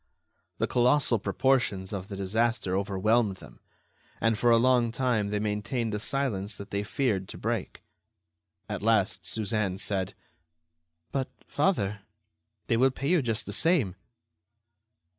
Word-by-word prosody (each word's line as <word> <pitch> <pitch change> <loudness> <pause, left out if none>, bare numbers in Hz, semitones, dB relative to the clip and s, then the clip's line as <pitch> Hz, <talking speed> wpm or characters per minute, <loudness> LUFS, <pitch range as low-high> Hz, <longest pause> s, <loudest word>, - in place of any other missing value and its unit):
The - - +1
colossal 125 -1 +3
proportions 110 -6 +1
of 95 -2 -4
the 100 - -6
disaster 100 0 0
overwhelmed 100 +2 +1
them, - - -15 0.6
and 115 0 +2
for 120 +2 +2
a 115 - +6
long 120 -1 +3
time 120 -4 0
they 105 +1 -1
maintained 110 +2 -2
a 105 - -1
silence 110 -5 -2
that 100 0 -9
they 100 - 0
feared 105 -3 -1
to - - -9
break. - - -3 0.8
At 105 -2 -4
last, 110 -1 +1
Suzanne 105 -3 -1
said: 95 -2 -2 1.0
"But, 135 -1 -1 0.2
father, 105 - 0 0.6
they 115 - +1
will 130 +3 +5
pay 135 +2 -3
you 180 -3 +4
just 115 -3 -1
the - - -5
same." 155 - +3
110 Hz, 140 wpm, -28 LUFS, 100-125 Hz, 1.0 s, a